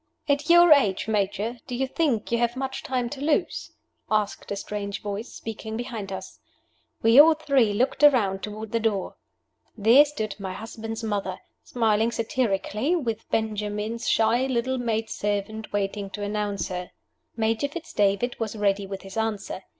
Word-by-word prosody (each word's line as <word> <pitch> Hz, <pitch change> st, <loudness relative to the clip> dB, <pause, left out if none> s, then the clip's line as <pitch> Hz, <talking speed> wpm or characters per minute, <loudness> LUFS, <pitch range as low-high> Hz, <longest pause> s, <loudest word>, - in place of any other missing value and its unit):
"At 285 Hz, +1 st, +1 dB
your 345 Hz, 0 st, +7 dB
age, 210 Hz, -9 st, +2 dB
Major, 215 Hz, +2 st, -1 dB
do 250 Hz, -, -4 dB
you 265 Hz, +2 st, 0 dB
think 260 Hz, -6 st, -1 dB
you 235 Hz, -, +2 dB
have 240 Hz, 0 st, +1 dB
much 265 Hz, 0 st, -3 dB
time 250 Hz, -2 st, -1 dB
to 280 Hz, -2 st, -6 dB
lose?" 315 Hz, +3 st, 0 dB, 0.4 s
asked 215 Hz, -2 st, -1 dB
a -, -, 0 dB
strange 200 Hz, 0 st, -4 dB
voice, 205 Hz, +3 st, -4 dB
speaking 220 Hz, 0 st, -6 dB
behind 225 Hz, -5 st, -5 dB
us. 190 Hz, 0 st, -7 dB, 0.6 s
We 225 Hz, +4 st, +7 dB
all 315 Hz, +2 st, +8 dB
three 275 Hz, -8 st, +2 dB
looked 255 Hz, +6 st, 0 dB
around 210 Hz, -10 st, +5 dB
toward 215 Hz, +1 st, -6 dB
the 230 Hz, -, +1 dB
door. 215 Hz, -4 st, -1 dB, 0.6 s
There 230 Hz, +7 st, +7 dB
stood 220 Hz, -9 st, -5 dB
my 190 Hz, -1 st, -4 dB
husband's 225 Hz, +2 st, -6 dB
mother, 200 Hz, -4 st, -2 dB, 0.3 s
smiling 225 Hz, -1 st, +1 dB
satirically, 230 Hz, -, 0 dB
with 230 Hz, -9 st, -3 dB
Benjamin's 215 Hz, +1 st, -2 dB
shy 230 Hz, +4 st, +3 dB
little 260 Hz, 0 st, 0 dB
maid 225 Hz, -2 st, -1 dB
servant 210 Hz, +1 st, -3 dB
waiting 200 Hz, 0 st, -2 dB
to 205 Hz, -, -4 dB
announce 205 Hz, -2 st, -2 dB
her. 180 Hz, -1 st, -5 dB, 0.5 s
Major 225 Hz, +4 st, +1 dB
Fitz 325 Hz, +3 st, -8 dB
David 205 Hz, +4 st, +1 dB
was 225 Hz, -1 st, -3 dB
ready 200 Hz, -1 st, +1 dB
with 195 Hz, 0 st, -6 dB
his 195 Hz, +2 st, -9 dB
answer. 215 Hz, -3 st, -3 dB
220 Hz, 160 wpm, -25 LUFS, 205-245 Hz, 0.6 s, all